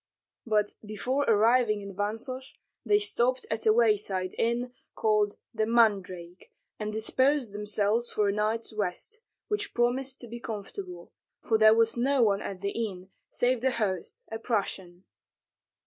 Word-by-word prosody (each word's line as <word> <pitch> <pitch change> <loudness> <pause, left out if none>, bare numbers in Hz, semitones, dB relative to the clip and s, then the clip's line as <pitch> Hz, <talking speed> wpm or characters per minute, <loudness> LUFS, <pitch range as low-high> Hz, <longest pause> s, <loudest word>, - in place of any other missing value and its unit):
But 210 -2 +1
before 250 +7 -1
arriving 225 -1 +3
at 195 - -9
Vansosh, 225 +6 -4 0.3
they 415 - +4
stopped 255 - +1
at 220 0 -1
a - - +7
wayside 210 -5 +2
inn 240 +2 0 0.2
called 210 -2 +2 0.2
"The 220 -1 0
Mandrake," 195 -6 +1 0.3
and 210 0 -3
disposed 260 +3 +1
themselves 210 +3 0
for 210 -1 +1
a 200 - +1
night's 215 +2 -1
rest, 215 - -3 0.3
which 420 0 -2
promised 255 +3 0
to 240 - -9
be 235 +1 -7
comfortable, 250 - -7 0.3
for 220 -1 +2
there 215 0 +7
was 230 +1 +2
no 265 +1 +3
one 200 -2 +2
at 190 -2 -6
the 200 0 -1
inn 195 -5 -4 0.2
save 245 -1 +1
the 265 - +3
host, 200 -8 -2
a 225 - -4
Prussian. 190 -6 -3
220 Hz, 150 wpm, -28 LUFS, 205-245 Hz, 0.3 s, a